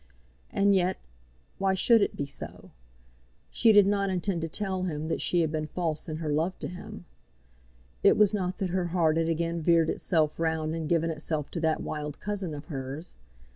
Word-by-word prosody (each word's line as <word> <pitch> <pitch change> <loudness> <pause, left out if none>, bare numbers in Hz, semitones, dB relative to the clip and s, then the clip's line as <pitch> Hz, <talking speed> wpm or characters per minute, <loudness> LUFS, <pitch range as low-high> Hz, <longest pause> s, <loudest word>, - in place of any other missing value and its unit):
And 200 0 +3
yet, 185 -1 +2 0.6
why 195 0 +2
should 225 +4 +5
it - - 0
be 140 - -2
so? 140 0 -8 0.8
She 230 - +5
did 205 -2 +7
not 200 0 +1
intend 185 -1 -1
to 165 - -3
tell 190 +1 -2
him 160 -3 -3
that - - -1
she 175 - +2
had 160 -2 0
been 155 -1 -2
false 165 -2 -3
in 155 - -3
her 155 -2 -2
love 165 +5 0
to - - -5
him. 205 +1 -9 1.0
It - - +5
was 210 -1 +5
not 185 -3 -1
that 190 -3 -2
her 185 -1 0
heart 165 -2 +2
had 165 0 +1
again 165 +1 -1
veered 165 0 +3
itself 155 -4 0
round 160 -1 0
and 160 -2 -3
given 165 -1 +2
itself 155 -1 -3
to 170 - -3
that 160 -1 0
wild 150 -1 -5
cousin 195 -6 -3
of 145 - -8
hers. 140 +2 -6
165 Hz, 195 wpm, -28 LUFS, 155-190 Hz, 1.0 s, did